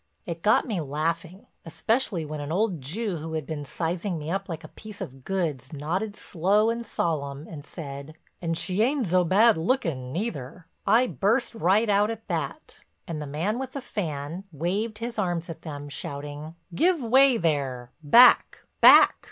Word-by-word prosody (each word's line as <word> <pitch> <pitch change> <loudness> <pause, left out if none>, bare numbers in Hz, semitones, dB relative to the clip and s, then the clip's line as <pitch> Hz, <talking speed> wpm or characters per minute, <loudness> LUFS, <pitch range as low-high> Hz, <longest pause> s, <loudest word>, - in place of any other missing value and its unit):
It 170 -1 -5
got 210 - +3
me 205 -8 -2
laughing, 165 +5 -3 0.2
especially 200 0 -1
when 150 0 -6
an 145 +1 -5
old 185 -3 0
Jew 185 - -3
who 160 +1 -6
had 155 -2 -3
been 150 -1 -5
sizing 170 +5 -3
me 155 +1 -5
up 195 +1 -3
like 165 -2 -5
a - - -9
piece 215 -2 -11
of 130 0 -8
goods 155 -9 -2
nodded 175 +8 -3
slow 205 +7 +1
and 235 0 -4
solemn 145 -5 -2
and 150 -3 -10
said: 140 -1 -8 0.3
"And 165 -1 -1
she 190 +3 -1
ain'd 260 +2 +2
zo 180 0 +3
bad 210 +5 +4
lookin' 160 - -1
neither." 165 - -5 0.2
I 225 +5 +5
burst 230 +2 0
right 215 +1 +2
out 205 +1 +3
at 225 -1 -6
that - - -4 0.3
and 160 -3 -4
the 150 - -5
man 170 - -2
with 265 -1 -5
the 280 - -4
fan 160 - -4
waved 195 +8 -2
his 230 0 -5
arms 175 -3 -1
at 165 - -10
them, 145 -2 -7
shouting: 145 +2 -6 0.2
"Give 345 - +2
way 260 +2 +5
there—back—back! 145 - +5
170 Hz, 170 wpm, -26 LUFS, 150-215 Hz, 0.3 s, I